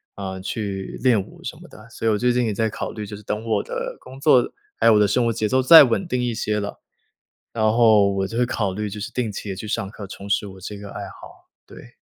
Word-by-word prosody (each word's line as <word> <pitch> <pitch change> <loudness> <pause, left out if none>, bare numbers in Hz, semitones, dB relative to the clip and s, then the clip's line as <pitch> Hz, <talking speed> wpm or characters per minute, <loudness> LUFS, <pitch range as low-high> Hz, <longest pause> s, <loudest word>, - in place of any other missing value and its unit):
啊， 95 -1 -5
去 95 0 -5
练 120 -6 +4
舞 - - -14
什 - - -5
么 - - -14
的。 - - -15
所 115 - -4
以 - - +4
我 105 - +1
最 125 +3 +2
近 125 0 +1
也 110 - -1
在 110 +2 0
考 - - -5
虑， 105 -1 -6
就 105 +1 -8
是 - - -13
等 105 +2 -3
我 110 -3 0
的 - - -5
工 130 +1 -12
作， 135 -4 +4 0.2
还 - - +2
有 115 - +7
我 105 - +5
的 105 - +4
生 120 +4 +1
活 115 - +1
节 110 -1 -1
奏 130 0 +3
再 160 +5 +10
稳 130 +10 -1
定 125 -6 -1
一 120 - -1
些 105 -1 -1
了， 100 - -5 0.7
然 110 - -1
后 110 -3 +5
我 95 0 -1
就 115 +4 -6
会 125 - +3
考 100 -5 -2
虑， 105 +1 -3
就 105 +1 -7
是 - - -5
定 120 -4 -2
期 100 +1 -7
地 95 - -3
去 105 - -7
上 95 -2 -2
课， 105 -2 -9
重 100 +1 -9
拾 100 +1 +1
我 95 -1 -11
这 105 +2 -7
个 100 0 -9
爱 - - -7
好， - - -15 0.2
对。 - - -14
105 Hz, 300 characters per minute, -22 LUFS, 100-120 Hz, 0.7 s, 再